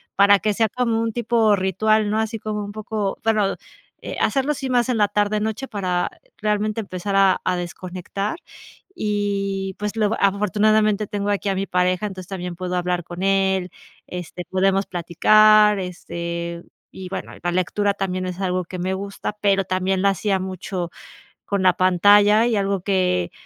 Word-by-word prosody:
para 200 0 +6
que 210 +1 0
sea 225 +2 +2
como 230 -1 0
un 230 0 -1
tipo 230 -2 +2
ritual, 210 +3 +1
¿no?, 215 - 0
así 220 0 -2
como 210 -1 -3
un 205 - -6
poco, 215 -2 -3
bueno, 215 -3 +1 0.5
eh, - - -6
hacerlo 275 +1 +1
así 270 -2 -4
más 245 -1 +2
en 245 - +1
la 210 - +4
tarde-noche 210 +4 -1
para 180 -3 -1 0.3
realmente 210 +1 -1
empezar 195 0 -4
a 195 -1 +4
a 185 - 0
desconectar. 185 - -5 0.6
Y 200 -2 -2
pues, 210 +2 -4
lo 215 0 +1
afortunadamente 210 +1 +2
tengo 205 0 -3
aquí 205 0 0
a 195 - 0
mi 195 +1 -1
pareja, 180 +3 +1
entonces, 185 -3 -7
también 180 -2 -5
puedo 180 +1 -4
hablar 180 0 -1
con 175 +3 -7
él, 190 -1 +1 0.4
este 180 0 -7
podemos 195 +1 +2
platicar 210 +4 +4
este, 170 -1 -5 0.3
y 185 -1 -8
bueno, - - -6
la 175 - 0
lectura 200 +3 0
también 185 -2 -3
es 180 0 -5
algo 185 -1 -1
que 180 +1 -8
me 185 +2 -1
gusta, 200 +2 -5
pero 195 -1 +2
también 185 +1 0
lo 200 - +3
hacía 195 +1 +1
mucho 185 -1 -5 0.5
con 200 -2 -1
la 185 -1 +5
pantalla 205 +4 +5
y 230 - +1
algo 195 -2 0
que 180 - 0
195 Hz, 170 wpm, -22 LUFS, 185-210 Hz, 0.6 s, para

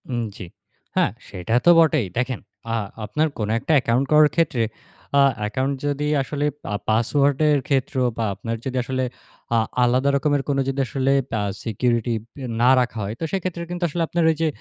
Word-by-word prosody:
উম, 120 -2 -1 0.2
জি। - - -7 0.5
হ্যাঁ, - - +3 0.2
সেটা 95 +3 -4
তো - - +7
বটেই। 155 -7 +4
দেখেন, 125 0 -1 0.3
আ - - 0 0.3
আপনার 155 +8 +1
কোনো 105 -1 -2
একটা 160 - -3
অ্যাকাউন্ট 125 +1 +2
করার 150 0 +6
ক্ষেত্রে, 145 -8 +2 0.5
আ - - +7 0.2
অ্যাকাউন্ট 130 +7 -1
যদি 145 0 -1 0.2
আসলে 145 +2 -2 0.3
আ - - +1
পাসওয়ার্ডের 140 +6 +3
ক্ষেত্রেও 130 -2 +1
বা 115 - 0
আপনার 115 +3 -4
যদি 130 -1 -2
আসলে 130 +1 -2 0.5
আ - - +4 0.3
আলাদা 130 +3 +3
রকমের 145 0 +1
কোনো 135 -1 +2
যদি 135 +1 -3
আসলে 135 +2 0 0.3
আ - - 0 0.2
সিকিউরিটি 120 +1 0 0.5
না 125 - +5
রাখা 125 -2 -1
হয়, 100 +2 -3
তো - - -5
সেক্ষেত্রে 185 -3 -3
কিন্তু 175 0 -4
আসলে 170 +3 -3
আপনার 170 +1 0
ওই 160 - +2
যে, 165 - +3
135 Hz, 175 wpm, -22 LUFS, 120-150 Hz, 0.5 s, তো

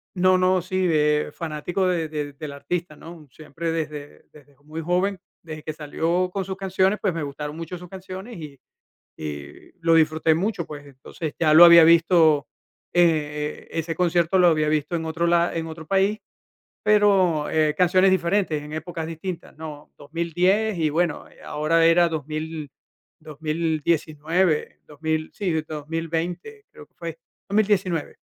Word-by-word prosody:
No 185 +1 +4
no, 185 0 +2
sí, 185 +1 -1
eh, 150 -1 +2
fanático 165 +4 -2
de 170 -3 0
de 150 -2 -5
del 145 +1 -7
artista, 165 +3 -4
¿no? 165 -2 -12
Siempre 165 +3 -5
desde 150 -3 -5
desde 145 -1 -19
muy 155 +2 -7
joven, 180 +4 0 0.2
desde 155 -2 -9
que 155 - -5
salió 165 +4 -1
con 195 0 -3
sus 190 0 -4
canciones, 190 +1 +1
pues 190 -5 0
me 165 - -2
gustaron 150 +2 -6
mucho 165 +2 -6
sus 180 0 -11
canciones, 190 +4 -8
y 150 -4 -10 0.6
y 75 -2 -8
lo 165 0 +3
disfruté 160 0 +3
mucho, 190 0 -2
pues, 145 -1 -9
entonces, 140 +3 -7
ya 155 -2 +4
lo 165 - +10
había 170 -1 +9
visto, 165 -3 +4 0.4
eh, 150 -3 0
ese 165 0 -3
concierto 175 0 +2
lo 180 - +6
había 155 -2 +2
visto 155 +2 0
en 165 -1 -3
otro 160 +1 -1
la 170 0 +2
en 165 -1 -3
otro 160 0 -9
país, 195 +4 +1 0.7
pero, 195 -7 +3
eh, 155 -1 +2
canciones 185 +2 +4
diferentes 185 -3 +1
en 150 +1 -10
épocas 160 +1 -5
distintas, 165 +2 -7
¿no? 150 -2 -9
2010 175 +7 0
y, 160 -2 +2
bueno, 165 0 -1
eh, - - -21
ahora 165 +2 +1
era 170 +1 +5
2000, 155 -1 -5 0.5
2019, 155 +1 -1
2000, 155 +1 -3
sí, 200 -3 -2
desde 160 -1 -2
2020 165 - -4
creo - - -13
que - - -47
fue - - -7 0.3
2019, 195 -6 0
165 Hz, 155 wpm, -23 LUFS, 155-180 Hz, 0.7 s, lo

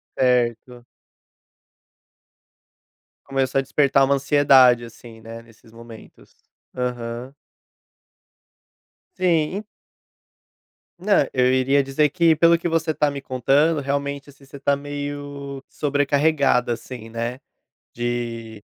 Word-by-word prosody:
Certo. 125 -1 0 2.4
Começou 135 -1 0
a - - +2
despertar 135 0 +2
uma 140 +1 +2
ansiedade 135 -4 +4
assim, 115 -1 -14
né, 115 0 -10
nesses 115 -1 -21
momentos, 115 -1 -15 0.4
aham. 125 0 -4 1.9
Sim. 180 +3 0 1.3
Não, 205 +3 +1 0.2
eu 130 0 +2
iria 135 +2 +2
dizer 140 +2 +1
que, 165 0 +3
pelo 170 +2 +4
que 170 - -3
você 165 -1 0
tá 150 -2 0
me 140 -1 -6
contando, 140 +5 +1
realmente 140 +1 -3
assim 140 0 -20
você 140 +1 -12
tá 140 +1 +1
meio 145 -1 -7
sobrecarregada, 145 -3 +1
assim, 115 -1 -9
né, 115 +3 -4 0.5
de 115 -2 -5
135 Hz, 100 wpm, -22 LUFS, 120-145 Hz, 2.4 s, ansiedade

